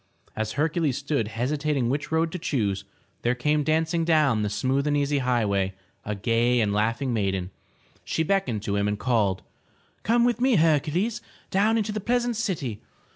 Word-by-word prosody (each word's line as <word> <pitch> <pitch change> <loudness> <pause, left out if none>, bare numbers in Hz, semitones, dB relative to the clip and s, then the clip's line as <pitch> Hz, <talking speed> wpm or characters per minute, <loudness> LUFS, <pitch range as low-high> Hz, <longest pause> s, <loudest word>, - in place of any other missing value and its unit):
As 110 0 -2
Hercules 155 -2 0
stood 140 -8 -1
hesitating 135 +4 -1
which 140 +5 -2
road 160 0 +1
to 180 - -5
choose, 105 -11 -1 0.4
there 120 +1 +1
came 150 +4 +1
dancing 160 +2 +1
down 155 -9 +3
the 105 - 0
smooth 135 +6 0
and 145 0 +2
easy 145 0 +1
high 125 -3 +1
way 95 -1 0 0.3
a 105 - -3
gay 115 +4 +2
and 105 -3 +1
laughing 115 +5 0
maiden. 95 -4 -1 0.5
She 160 - -1
beckoned 160 - 0
to 100 -2 -1
him 100 0 +1
and 105 0 -1
called: 105 -5 +1 0.3
" - - -36
Come 235 +3 +3
with 245 0 +1
me, 255 -2 +4
Hercules, 165 +6 +2 0.3
down 215 +4 +3
into 215 -1 -1
the 215 0 -3
pleasant 245 +2 0
city. 165 - -3
140 Hz, 180 wpm, -25 LUFS, 110-165 Hz, 0.5 s, me